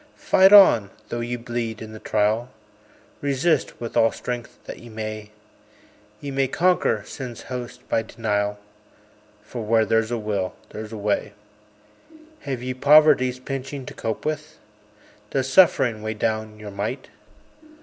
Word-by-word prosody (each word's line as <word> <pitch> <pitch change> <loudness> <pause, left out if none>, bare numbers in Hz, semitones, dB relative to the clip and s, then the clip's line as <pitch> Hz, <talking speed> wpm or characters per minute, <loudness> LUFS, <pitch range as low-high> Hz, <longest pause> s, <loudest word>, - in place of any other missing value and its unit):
Fight 190 +1 +4
on, 185 - +8 0.2
though 120 - -3
ye 120 +1 -3
bleed 120 -2 -4
in 110 -1 -8
the 110 - -9
trial, 110 +4 0 0.7
Resist 145 +2 0
with 115 -1 -6
all 115 - +4
strength 120 -1 -6
that - - -8
ye 120 - -12
may; 110 -1 -6 0.9
Ye 140 - -6
may 135 0 +1
conquer 175 - +1
Sin's 125 -3 -8
host 125 -1 -7
by - - +1
denial; 105 -2 -2 0.9
For 115 +3 -7
"Where 110 +1 +3
there's 115 +1 +1
a 120 - -1
will 105 -4 -2 0.2
there's 110 0 -7
a 110 - -6
way." 105 0 -1 1.1
Have 130 -4 -5
ye 130 0 -2
Poverty's 140 -2 +5
pinching 135 +1 -5
to - - -8
cope 110 -1 -4
with? 155 0 -4 0.7
Does 135 -1 -1
Suffering 130 - +4
weigh 110 0 -3
down 110 0 -2
your 105 -1 -9
might? 105 +7 -4
120 Hz, 145 wpm, -23 LUFS, 110-135 Hz, 1.1 s, on